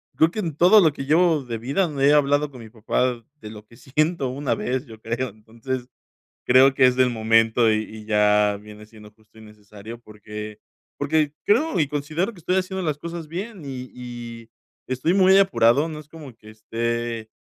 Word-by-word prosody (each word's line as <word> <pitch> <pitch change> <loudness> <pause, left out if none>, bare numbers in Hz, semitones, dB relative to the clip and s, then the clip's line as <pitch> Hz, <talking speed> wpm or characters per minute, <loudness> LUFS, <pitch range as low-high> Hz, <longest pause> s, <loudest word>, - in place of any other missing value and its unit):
creo 160 +1 +3
que 215 - -5
en 165 -8 -3
todo 180 +7 +6
lo 160 -5 +3
que 135 - -6
llevo 160 0 +3
de 120 -2 -5
vida 140 - -1
he 140 +2 +5
hablado 145 0 +2
con 125 -3 -12
mi 110 - -12
papá 120 +2 -1
de 110 -8 -11
lo 105 -1 -12
que 115 - -18
siento 150 +2 -1
una 140 +2 -2
vez, 130 +3 -3
yo 110 -1 -12
creo. 115 +3 -3
Entonces, 115 +4 -7 0.6
creo 130 +2 +5
que 130 -1 +5
es 125 - +2
del 130 -1 +3
momento 115 0 +3
y 110 0 +1
y 110 0 -11
ya 105 -1 +2
viene 105 0 -13
siendo 105 -1 -15
justo 110 +1 -24
y - - -13
necesario 105 +1 -12
porque 105 -1 -9 0.4
porque 150 0 0
creo 230 - +2
y 150 - +2
considero 155 +8 -2
que 200 - -17
estoy 180 +3 -1
haciendo 190 0 -2
las 155 -4 -2
cosas 170 -1 -7
bien 190 +3 -6
y 130 -2 -7
y 120 -2 -9 0.4
estoy 130 +7 0
muy 190 0 +5
apurado, 140 -5 +3
no 155 -1 -7
es 150 - -17
como 150 -5 -12
que 110 -1 -18
esté, 115 +1 -4
130 Hz, 195 wpm, -23 LUFS, 110-155 Hz, 0.6 s, todo